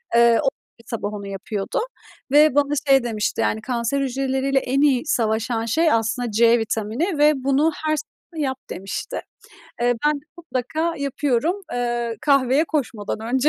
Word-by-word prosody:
Iıı, 235 - +7 0.2
o 275 -3 +2 0.3
yüzden 230 - -19
sabah 205 +1 -4
onu 200 -1 -6
yapıyordu 195 - -3 0.5
ve 295 -1 +6
bana 290 0 +2 0.2
şey 270 -2 +6
demişti 215 -3 -1
yani 220 - 0
kanser 245 +3 -1
hücreleriyle 270 +1 0
en 270 +2 0
iyi 275 -3 +3
savaşan 225 -2 0
şey 320 +8 +2
aslında 230 +1 0
C 230 +2 +4
vitamini 225 - -2
ve 300 +1 +5
bunu 280 +4 +3
her 310 0 +2
sabah 315 0 -7
yap 265 -1 -1
demişti. 195 +1 -5 0.6
Eee, 245 0 +3
ben 300 -1 +1
de - - -29
mutlaka 320 +2 -2
yapıyorum, 285 +6 0
ııı, 240 -1 -1
kahveye 275 +1 +3
koşmadan 235 -11 -3 0.2
önce. 265 +3 +3
260 Hz, 155 wpm, -22 LUFS, 230-290 Hz, 0.6 s, Iıı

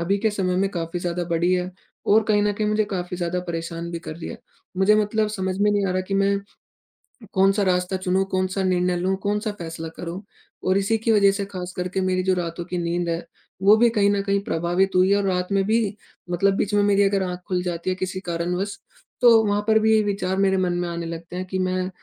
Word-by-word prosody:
अभी 195 +4 +1
के 220 +1 +1
समय 185 -3 -1
में 195 +1 +2
काफ़ी 170 -1 -3
ज़्यादा 175 0 -2
बड़ी 170 +2 +2
है 180 0 -2 0.4
और 220 +2 +6
कहीं 205 -1 +3
न 210 - +2
कहीं 210 +1 -2
मुझे 215 0 +2
काफ़ी 180 -1 -3
ज़्यादा 175 0 -2
परेशान 170 0 -4
भी 170 - -4
कर 160 - -8
रही 170 - -7
है। - - -7 0.4
मुझे 190 +3 +4
मतलब 215 0 +1
समझ 190 -3 -3
में 210 +1 +3
नहीं 205 -1 +1
आ - - -1
रहा 185 - 0
कि 195 - -1
मैं 200 0 +2 0.9
कौन-सा 195 +2 +3
रास्ता 180 0 +1
चुनूँ 185 +1 +1
कौन-सा 185 +1 0
निर्णय 180 -1 +1
लूँ 185 +2 0
कौन-सा 210 +1 -1
फैसला 165 -1 -6
करूँ? 175 +3 -6 0.4
और 185 +1 +3
इसी 220 +3 +1
की 225 +1 +1
वजह 200 -2 +5
से 200 0 -2
ख़ासकर 180 -2 -5
के 190 +1 -2
मेरी 185 0 +1
जो 190 0 +2
रातों 170 -1 -4
की 180 0 -4
नींद 170 0 -1
है, 170 0 -2 0.4
वो 205 +2 +7
भी 235 +1 +4
कहीं 205 -3 +3
न 200 -1 +1
कहीं 200 0 +1
प्रभावित 175 +3 +1
हुई 185 +1 +4
है 200 - +5
और 200 - 0
रात 180 -1 0
में 195 -1 +3
भी 215 -2 +1 0.3
मतलब 195 +3 +2
बीच 205 +1 -1
में 205 - +4
मेरी 205 0 +3
अगर 195 -1 +2
आँख 180 -1 -4
खुल 180 -1 0
जाती 175 0 -3
है 185 - -1
किसी 185 0 -4
कारणवश, 180 +3 -3 0.4
तो 230 -2 +7
वहाँ 205 0 +1
पर 220 0 +5
भी 220 0 +4
विचार 195 -2 -1
मेरे 195 -1 +3
मन 180 -1 +1
में 175 - -2
आने 170 -1 -4
लगते 165 +2 -7
हैं 185 - -3
कि 190 0 -3
मैं 185 0 0
185 Hz, 235 wpm, -23 LUFS, 180-200 Hz, 0.9 s, वो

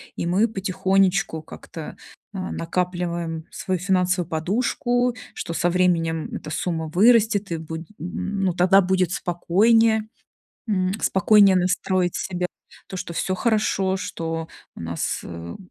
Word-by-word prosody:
и - - -3
мы 195 +6 +3
потихонечку 190 -4 +1
как-то, 155 0 -9 0.4
а, 185 -2 -4
накапливаем 170 -2 -2
свою 185 -2 -3
финансовую 180 -2 +1
подушку, 240 +8 0 0.2
что 170 - -5
со 175 - +1
временем 170 -3 +1
эта - - -7
сумма 160 -2 -2
вырастет 210 -1 +4
и 165 - -1
будет, 160 +1 -7
м, 195 +4 -3
ну, 185 -2 +2
тогда 185 +3 +5
будет 185 -1 +1
спокойнее, 220 +6 +3 0.7
м, 185 -2 +1
спокойнее 195 0 +5
настроить 180 0 +1
себя. 180 -2 -2 0.4
То, 190 - -6
что 180 -1 -5
всё 185 +3 -1
хорошо, 195 -3 +1
что 165 -2 -4 0.3
у - - -11
нас, 85 0 -2
э, 85 0 -7
185 Hz, 130 wpm, -23 LUFS, 170-195 Hz, 0.7 s, тогда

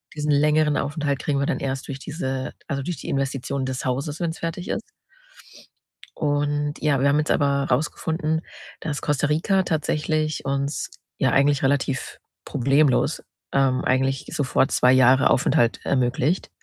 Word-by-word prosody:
Diesen 150 -1 -1
längeren 150 +1 +3
Aufenthalt 145 -1 -1
kriegen 140 -2 -1
wir 140 - +1
dann - - -1
erst 135 0 -3
durch 140 - -5
diese 135 -4 -4
also, 140 -1 -2
durch 175 +2 -4
die - - -7
Investitionen 135 0 -2
des 130 0 -4
Hauses, 140 +4 -2
wenn's 170 -1 -3
fertig 165 +2 -4
ist. - - -2 1.3
Und 145 0 0
ja, 145 -3 +2
wir 140 - +4
haben 145 +2 +3
jetzt 155 - -1
aber 140 -1 +2
rausgefunden, 160 +3 -1 0.4
dass 150 -2 -4
Costa 145 -1 0
Rica 185 +6 +2
tatsächlich 155 -2 -1
uns, 140 +2 -2 0.3
ja, - - +2
eigentlich 140 +1 +3
relativ 135 -1 -1 0.3
problemlos, 135 +2 +2 0.3
ähm, 135 -2 +2
eigentlich 135 +1 0
sofort 135 0 +1
2 125 +1 +4
Jahre 130 +1 +5
Aufenthalt 120 -2 +2
ermöglicht. 135 +6 0
140 Hz, 150 wpm, -23 LUFS, 135-150 Hz, 1.3 s, Jahre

